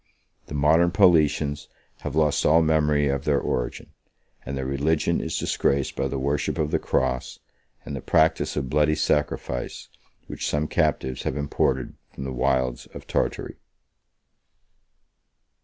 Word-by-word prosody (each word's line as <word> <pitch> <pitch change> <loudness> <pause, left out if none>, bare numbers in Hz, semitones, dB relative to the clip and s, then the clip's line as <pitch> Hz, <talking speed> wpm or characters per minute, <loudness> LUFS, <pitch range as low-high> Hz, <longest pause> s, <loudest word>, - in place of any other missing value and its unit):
The 75 - -6
modern 80 +4 +4
Paulicians 75 -6 +3 0.3
have - - -5
lost 75 -2 +2
all 80 +2 +5
memory 75 -2 +2
of 70 0 -1
their 70 -2 +2
origin; - - -3 0.5
and 70 +2 -5
their 65 - -3
religion 70 +4 0
is - - -3
disgraced 70 -1 0
by - - -1
the 70 - -3
worship 70 +2 -1
of 75 -1 -1
the - - +1
cross, 65 -1 -1 0.5
and 70 - -5
the 65 - -5
practice 80 0 +2
of 70 -3 -2
bloody 75 +3 +2
sacrifice, 75 -5 -2 0.4
which - - -5
some 75 +1 0
captives 65 -4 0
have - - -3
imported 70 0 -1 0.2
from 65 - -8
the 65 -1 -4
wilds 65 -1 0
of - - -9
Tartary. - - -2
75 Hz, 140 wpm, -24 LUFS, 65-75 Hz, 0.5 s, all